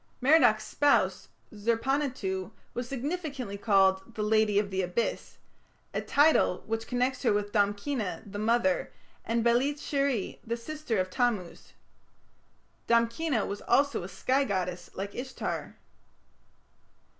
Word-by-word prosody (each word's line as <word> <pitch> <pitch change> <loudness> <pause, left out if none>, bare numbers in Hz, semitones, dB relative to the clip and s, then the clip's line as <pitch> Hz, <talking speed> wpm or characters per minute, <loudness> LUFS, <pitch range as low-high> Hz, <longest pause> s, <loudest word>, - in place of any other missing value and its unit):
Merodach's 250 -6 +5
spouse 290 -1 +2 0.3
Zer 225 +2 +1
panituᵐ 250 -8 -1 0.2
was 245 0 -4
significantly 275 - -4
called 195 +1 +2
"the 215 - -2
lady 215 -1 +3
of 205 -1 +1
the 190 0 0
Abyss", 180 +6 -2 0.6
a - - -1
title 290 - +3
which 225 0 -3
connects 250 +1 0
her 250 - +3
with 205 0 -1
Damkina, 205 +2 -1
the 205 0 -7
mother, 235 +5 +1 0.3
and 230 0 0
Belit 250 +5 +3
sheri, 275 -7 -1
the 235 +1 -3
sister 300 -1 -3
of 185 0 -1
Tammuz. 215 -6 -2 1.1
Damkina 235 +2 +2
was 200 +1 -5
also 280 0 +2
a 175 - -6
sky 265 +8 +1
goddess 180 -6 -3
like 200 +1 -5
Ishtar. 260 +2 -5
230 Hz, 125 wpm, -29 LUFS, 200-270 Hz, 1.1 s, Merodach's